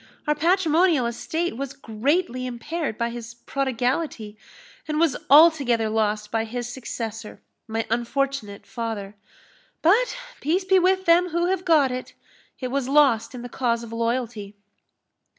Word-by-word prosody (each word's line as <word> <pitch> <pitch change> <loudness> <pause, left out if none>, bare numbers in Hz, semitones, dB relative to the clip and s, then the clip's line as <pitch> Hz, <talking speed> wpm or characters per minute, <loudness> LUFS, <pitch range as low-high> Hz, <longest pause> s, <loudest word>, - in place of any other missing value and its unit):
Our 300 - +2
patrimonial 330 -2 +3
estate 315 +7 -2
was 275 0 -4
greatly 255 +3 -1
impaired 250 +2 -4
by 235 0 -1
his 235 0 -8
prodigality, 250 -3 -2 0.5
and 305 0 -1
was 320 -6 +3
altogether 275 -7 +5
lost 210 -1 -1
by 225 -1 0
his 240 +1 -4
successor, 230 -3 -6 0.3
my 225 0 -2
unfortunate 240 -2 -2
father. 220 -4 -5 0.7
But 455 +10 +3 0.2
peace 355 +6 0
be 380 0 +5
with 375 +1 +2
them 345 +2 +4
who 345 +2 0
have 380 -1 -1
got 305 -7 +4
it! 255 0 -6 0.4
it 255 - -3
was 270 0 -2
lost 270 -5 +3
in 245 - -7
the - - -5
cause 235 -1 -1
of 230 -1 -9
loyalty." 230 -3 -2
255 Hz, 140 wpm, -24 LUFS, 230-320 Hz, 0.7 s, altogether